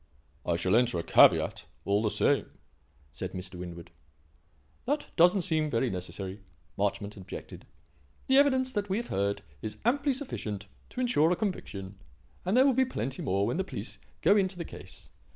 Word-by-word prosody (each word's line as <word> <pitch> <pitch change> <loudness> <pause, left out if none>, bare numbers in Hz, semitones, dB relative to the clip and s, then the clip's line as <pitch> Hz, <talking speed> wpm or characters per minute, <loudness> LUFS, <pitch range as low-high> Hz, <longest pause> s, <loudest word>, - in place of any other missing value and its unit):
"I 85 - +2
shall 95 +4 +2
enter 120 -5 +3
a 85 - -2
caveat, - - +5 0.2
all 100 +1 +2
the 110 - +1
same," - - +2 0.6
said - - -5
Mr. 90 0 -6
Winwood. 85 -1 -8 0.9
"That 290 +3 -1
doesn't 180 +2 +5
seem 155 -2 +1
very 120 -1 +1
necessary," 95 +2 -6 0.3
Marchmont 100 +1 -1
objected. 95 - -9 0.6
"The 265 - +4
evidence 260 -2 +4
that 205 -3 -2
we 190 - +1
have 240 +1 -4
heard 100 +1 -1 0.2
is 105 -1 -5
amply 280 +3 +2
sufficient 105 - -5 0.2
to 255 - -4
ensure 200 -11 +3
a 180 - +3
conviction 100 - -4 0.4
and 190 +6 +1
there 260 - +7
will 275 - +5
be 260 +2 +4
plenty 135 - -3
more 100 +2 +1
when - - -1
the 190 - +1
police - - -6 0.2
go 200 - +6
into 190 -3 +1
the 170 - -4
case. - - -11
145 Hz, 170 wpm, -29 LUFS, -, 0.9 s, there